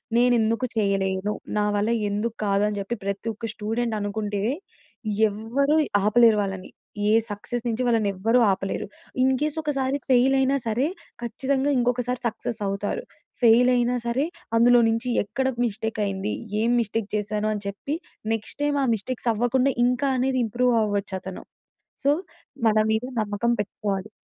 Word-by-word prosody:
నేనెందుకు 235 -1 +3
చేయలేను? 195 -1 0 0.2
నా 210 - +2
వల్ల 205 +2 +1 0.2
ఎందుకు 215 +3 -2
కాదు? 200 0 +2
అని 210 -1 -3
చెప్పి 200 +4 -3
ప్రతి 200 +2 -3
ఒక్క 225 +2 -5
స్టూడెంట్ 225 +2 -2
అనుకుంటే, 205 0 -2 0.9
ఎవ్వరూ 235 +8 0 0.3
ఆపలేరు 220 +1 +5
వాళ్ళని. 195 -2 -4 0.4
ఏ - - +4 0.2
సక్సెస్ 225 +3 -4
నుంచి 235 +2 -1
వాళ్ళని 225 -4 +2
ఎవ్వరూ 225 +6 +2
ఆపలేరు. 195 +1 -2 0.4
ఇన్‌కేస్ 275 +4 +1
ఒకసారి 275 -2 0
ఫెయిల్ 260 +1 +5
అయినా 265 +1 +2
సరే 235 +6 +1 0.4
ఖచ్చితంగా 265 +4 0
ఇంకొకసారి 245 0 0
సక్సెస్ 225 0 -4
అవుతారు. 200 +1 -2 0.4
ఫెయిల్ 240 +2 +6
అయినా 245 0 +1
సరే 255 +5 +1 0.3
అందులో 240 +1 +6
నుంచి 230 +2 -1
ఎక్కడ 240 +6 -2 0.2
మిస్టేక్ 220 0 -3
అయింది? 195 +1 -2 0.3
ఏం 230 +2 +2
మిస్టేక్ 220 -1 -2
చేశాను? 210 +1 -1
అని 205 - -5
చెప్పి 200 +9 -3 0.4
నెక్స్ట్ 225 +5 -4
టైమ్ 290 -1 +1
ఆ - - 0
మిస్టేక్స్ 235 +3 -3
అవ్వకుండా 250 +4 +2
ఇంకా 250 +3 +1
అనేది 260 0 +1
ఇంప్రూవ్ 245 +3 +1
అవ్వచ్చు 205 -2 -2
అతను. 190 -1 -7 0.6
సో, - - +5 0.6
మన 215 0 +3 0.2
మీద 220 +2 0 0.2
నమ్మకం 210 +3 0
పెట్టుకోవాలి. 200 -1 -4
225 Hz, 145 wpm, -24 LUFS, 205-250 Hz, 0.9 s, ఫెయిల్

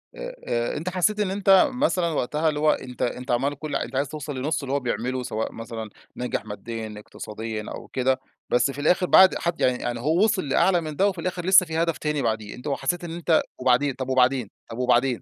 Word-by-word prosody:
آآ - - -7
آآ 120 +4 -1
أنت 170 +4 -3
حسيت 190 +4 +1
إن 195 -2 0
أنت 195 +5 +5
مثلًا 250 - +1
وقتها 150 +2 0
اللي 150 -1 -2
هو 155 0 +4
أنت 125 -1 -5
أنت 125 +1 -2
عمّال 135 +4 +1
كُلّ 155 -1 -4
أنت 130 - -3
عايز 140 +1 0
توصل 145 -2 -6
لنُصّ 145 +2 -1
اللي 135 0 -3
هو 140 - +2
بيعمله 125 0 -2
سواء 110 -1 -3
مثلًا 115 -1 -7 0.3
ناجح 125 -4 -3
ماديًا، 110 +1 -6
اقتصاديًا 110 0 -6
أو - - -10
كده، 130 0 0 0.3
بس 130 +3 +2
في 145 - -6
الآخر 180 +4 +3
بعد 190 +1 +7
حد 170 0 -2
يعني 125 -1 +3
يعني 120 -1 -2
هو 160 - +2
وصل 195 -8 +1
لأعلى 175 +4 +3
من 155 -2 -6
ده، 200 +5 +3
وفي 185 -4 -2
الآخر 180 -1 -3
لسه 190 -1 +7
فيه 160 0 -1
هدف 165 -1 0
تاني 150 -2 -1
بعديه، 110 -2 -2
أنت 125 +4 -9
حسيت 140 +5 -1
إن 170 - -5
أنت 170 -2 +2 0.2
وبعدين؟ 130 +2 +2
طَب 130 0 -5
وبعدين، 130 -3 +2 0.2
طَب 115 - -6
وبعدين. 125 0 +2
140 Hz, 220 wpm, -24 LUFS, 125-170 Hz, 0.3 s, بعد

